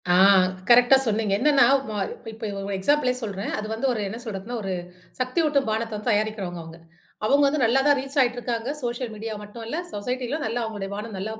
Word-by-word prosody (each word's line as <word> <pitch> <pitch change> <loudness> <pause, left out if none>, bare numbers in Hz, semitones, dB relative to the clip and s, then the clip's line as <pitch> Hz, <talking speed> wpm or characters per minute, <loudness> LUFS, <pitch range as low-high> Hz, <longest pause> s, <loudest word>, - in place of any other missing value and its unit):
ஆ! - - +5 0.6
கரெக்ட்டா 245 +2 +7
சொன்னீங்க! 215 -2 +1
என்னென்னா 285 -1 +5 0.2
வ - - -4 0.2
இப்ப, - - -18
இப்ப 220 +1 -7 0.2
ஒரு 200 - -3
எக்ஸாம்பிளே 255 +6 +2
சொல்றேன். 200 -2 -4
அது 215 - -4
வந்து 225 +5 -3
ஒரு 225 - -3
என்ன 225 +4 -6
சொல்றதுன்னா, 220 +1 -5
ஒரு 195 -2 -4 0.5
சக்தியூட்டும் 280 +1 +1
பானத்தைவந்து 220 0 -2
தயாரிக்கிறவுங்க 205 -5 -1
அவுங்க. 165 +1 -12 0.5
அவுங்க 280 +6 +4
வந்து 290 +1 0
நல்லா 235 +4 +4
தான் 290 -1 +5
ரீச் 275 +2 -6
ஆயிட்டு 245 -1 +2
இருக்காங்க. 235 0 -3
சோஷியல் 240 0 -3
மீடியா 220 +1 -5
மட்டும் 210 +3 -9
இல்ல 270 - -3 0.2
சொசைட்டிலும் 250 +7 -3
நல்லா 230 +2 -2
அவங்களுடைய 210 -3 -5
பானம் 210 +1 -6
நல்லா 210 +4 -4
230 Hz, 190 wpm, -24 LUFS, 210-255 Hz, 0.6 s, கரெக்ட்டா